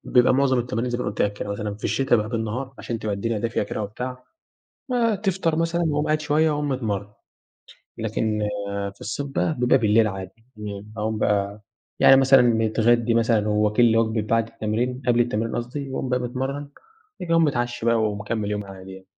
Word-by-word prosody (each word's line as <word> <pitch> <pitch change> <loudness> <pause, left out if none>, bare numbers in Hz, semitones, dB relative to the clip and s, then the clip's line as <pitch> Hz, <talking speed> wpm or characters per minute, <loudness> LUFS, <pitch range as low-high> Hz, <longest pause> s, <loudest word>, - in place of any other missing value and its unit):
بيبقى 125 0 +4
معظم 130 -2 +3
التمارين 120 0 -2
زي 120 - -2
ما - - -3
أنا - - -1
قُلت 105 - -1
لك 105 - +1
كده 105 - -6
مثلًا 105 0 -3
في 105 - -13
الشتا 135 -3 +2
بقي 105 0 -1
بالنهار 120 +3 -3
عشان 115 -1 -4
تبقى 105 -2 -2
الدنيا 110 +2 -2
دافية 115 0 -1
كده 105 +1 -4
وبتاع. 125 +5 -6 0.7
ما 235 -4 +2
تفطر 190 -5 0
مثلًا 165 +1 0
وأقوم 150 0 0
قاعد 155 0 +1
شوية 155 +1 +2
وأقوم 145 0 -1
متمرن، 105 -6 -2 0.9
لكن 110 -1 -1 0.5
في - - -28
الصيف 115 +7 -4
بقى 145 +3 -1
بيبقى 125 +2 +4
بالليل 110 -1 +4
عادي 95 -1 -6 0.3
امم 105 0 -7
أقوم 110 0 -2
بقى 100 0 0 0.4
يعني 135 - +8
مثلًا 135 -1 +6
متغدّي 115 0 +2
مثلًا 115 -2 +2
وواكل 105 +3 +3
لي 115 -1 +4
وجبة 110 -1 +1
بَعد 115 +1 +1
التمرين 120 +4 -2
قبل 120 0 +4
التمرين 115 -1 0
قصدي 135 +3 -4
وأقوم 130 0 -3
بقى 125 0 +1
متمرن 130 +3 -3
بَعد 140 - -13 0.5
كده 170 -2 -4
أقوم 165 0 +5
متعشي 120 -5 -1
بقى 115 0 +4
ومكمل 105 0 -2
يومي 105 -1 -3
عادي 95 -1 -10
يعني. 95 0 -12
115 Hz, 195 wpm, -23 LUFS, 105-135 Hz, 0.9 s, يعني